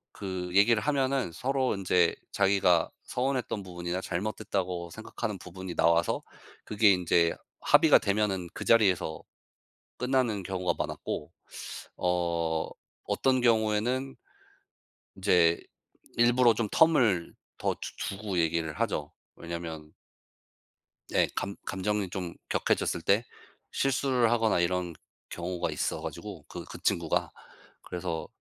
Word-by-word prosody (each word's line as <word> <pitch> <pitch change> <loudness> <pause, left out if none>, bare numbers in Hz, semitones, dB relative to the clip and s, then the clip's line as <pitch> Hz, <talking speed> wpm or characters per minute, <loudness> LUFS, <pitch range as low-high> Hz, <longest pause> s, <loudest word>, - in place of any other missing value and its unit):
그 95 -3 -4
얘기를 105 +2 +5
하면은 135 - 0
서로 130 +4 0
인제 90 -3 +2 0.2
자기가 95 -4 +3
서운했던 125 -5 -2
부분이나 90 0 -4
잘못됐다고 90 -2 -3
생각하는 110 0 -5
부분이 90 0 -8
나와서 85 +1 +2 0.4
그게 105 -1 +4
인제 85 -2 +2 0.3
합의가 - - +6
되면은 100 -3 0
그 - - -6
자리에서 95 -8 +3 0.8
끝나는 125 -5 +1
경우가 90 -1 -1
많았고 - - -4 0.7
어 85 -2 0 0.3
어떤 130 -1 +1
경우에는 120 +3 +1 1.0
이제 90 -4 +4 0.6
일부러 120 0 +5
좀 110 0 -1
텀을 125 - +3 0.2
더 - - 0
두 - - -30 0.2
주 95 - -4
두고 100 -3 -3
얘기를 80 -1 +1
하죠. 90 -10 -1 0.2
왜냐하면 80 -2 -7 1.2
예 - - +4
감 100 0 -3
감정이 100 0 -1
좀 90 -2 -4 0.2
격해졌을 85 - 0
때 100 +7 +3 0.5
실수를 130 -3 +2
하거나 115 -5 +2
이런 90 0 0 0.4
경우가 90 0 -3
있어 - - -2
가지고 - - -7
그 - - -7
그 - - -10
친구가. 85 -2 0 0.5
그래서 85 -2 -4
95 Hz, 265 characters per minute, -29 LUFS, 85-115 Hz, 1.2 s, 합의가